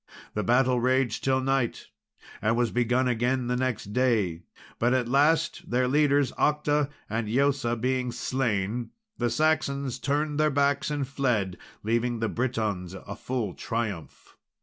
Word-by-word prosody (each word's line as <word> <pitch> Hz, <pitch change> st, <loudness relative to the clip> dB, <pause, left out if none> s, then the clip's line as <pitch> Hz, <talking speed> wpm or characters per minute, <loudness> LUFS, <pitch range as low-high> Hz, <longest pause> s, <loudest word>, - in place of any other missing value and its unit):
The 105 Hz, -, -1 dB
battle 125 Hz, +4 st, +3 dB
raged 130 Hz, -1 st, +1 dB
till 130 Hz, 0 st, +2 dB
night, 135 Hz, -2 st, 0 dB, 0.6 s
and 110 Hz, +2 st, +1 dB
was 120 Hz, -1 st, +1 dB
begun 125 Hz, +2 st, +2 dB
again 125 Hz, +1 st, +1 dB
next 125 Hz, -4 st, -2 dB
day; 110 Hz, -10 st, +1 dB, 0.4 s
but 120 Hz, +2 st, +3 dB
at 125 Hz, -2 st, 0 dB
last, 160 Hz, +6 st, +2 dB
their 125 Hz, +1 st, +2 dB
leaders, 145 Hz, 0 st, +3 dB
Octa 150 Hz, -1 st, +2 dB, 0.2 s
and 110 Hz, +1 st, -2 dB
Eosa, 130 Hz, -1 st, +1 dB
being 125 Hz, 0 st, 0 dB
slain, 120 Hz, -2 st, -1 dB, 0.3 s
the 120 Hz, 0 st, +1 dB
Saxons 140 Hz, -3 st, 0 dB
turned 150 Hz, +1 st, -1 dB
their 155 Hz, 0 st, +4 dB
backs 140 Hz, +1 st, +1 dB
and 145 Hz, -3 st, -2 dB
fled, 120 Hz, -9 st, 0 dB, 0.3 s
leaving 115 Hz, +2 st, 0 dB
the 115 Hz, -1 st, -1 dB
Britons 110 Hz, -7 st, -2 dB
a 100 Hz, +1 st, -8 dB
full 120 Hz, -7 st, -3 dB
triumph. 105 Hz, -8 st, -5 dB
125 Hz, 140 wpm, -27 LUFS, 115-140 Hz, 0.6 s, their